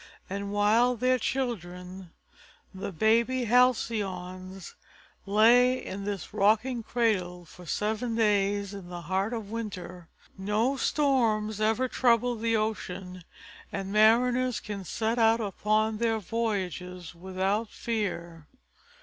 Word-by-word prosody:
And 200 +1 -4
while 220 +5 +3
their 255 +2 +2
children, 185 -8 -4 0.6
the 190 +1 -5
baby 230 +7 +2
Halcyons, 195 -7 0 0.5
lay 240 +5 +5
in 200 -4 -6
this 200 -4 -5
rocking 220 +4 +2
cradle, 195 -7 -1
for 175 +2 -14
seven 220 +6 -1
days 205 -2 +1
in 195 -3 -9
the 175 -1 -6
heart 190 +5 -1
of 220 -4 -5
winter, 180 -6 -6 0.3
no 215 +7 +1
storms 225 -8 +1
ever 225 +4 +2
troubled 240 -2 +2
the 230 0 +1
ocean 185 -4 -4 0.5
and 195 -1 -4
mariners 245 +3 +4
could 200 -3 -7
set 225 +6 -1
out 225 0 +4
upon 215 +1 0
their 230 -1 +1
voyages 185 -5 -3
without 190 +5 -2
fear. 175 -10 -4
210 Hz, 115 wpm, -28 LUFS, 190-230 Hz, 0.6 s, lay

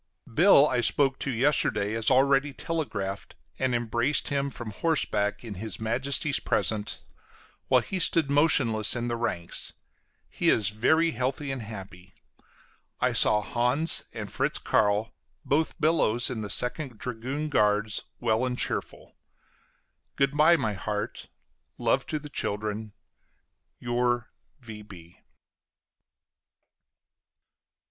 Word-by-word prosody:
Bill 155 - +6
I 125 -3 0
spoke 135 +3 +1
to - - -3
yesterday, 120 -5 +1
as 115 -1 +1
already 135 +2 +3
telegraphed, 105 - -4 0.2
and 130 -2 0
embraced 120 +4 0
him 140 0 -1
from 120 -4 -8
horseback 105 -7 -1
in 115 -3 -7
his 105 +1 -6
Majesty's 135 +6 +2
presence, 105 -1 -1 0.6
while - - +4
he 190 - -4
stood 165 -3 +4
motionless 140 -8 +2
in 120 0 -3
the 120 - -1
ranks. 110 -8 -2 0.5
He - - 0
is 105 -4 +2
very 160 +10 +2
healthy 135 +4 -3
and 135 -2 -4
happy. 95 -3 -10 0.8
I - - +1
saw 105 0 +4
Hans 125 +9 +1
and - - -7
Fritz - - 0
Carl, 105 +2 +1 0.3
both 155 +4 0
Billows, 145 -7 +3
in 115 -3 -4
the 105 - -5
Second 125 +1 0
dragoon 130 +6 -4
guards, 105 -4 +1
well 115 0 +1
and 125 -1 -2
cheerful. - - -4 1.0
Good 140 +1 +1
by, 160 +3 +5
my 110 -8 -2
heart; 105 +2 -5 0.5
love 120 +3 0
to 155 - -2
the 150 0 -8
children. 105 -3 -4 0.9
Your 120 0 -1 0.3
V. 105 -7 -12
120 Hz, 120 wpm, -27 LUFS, 105-140 Hz, 1.0 s, Bill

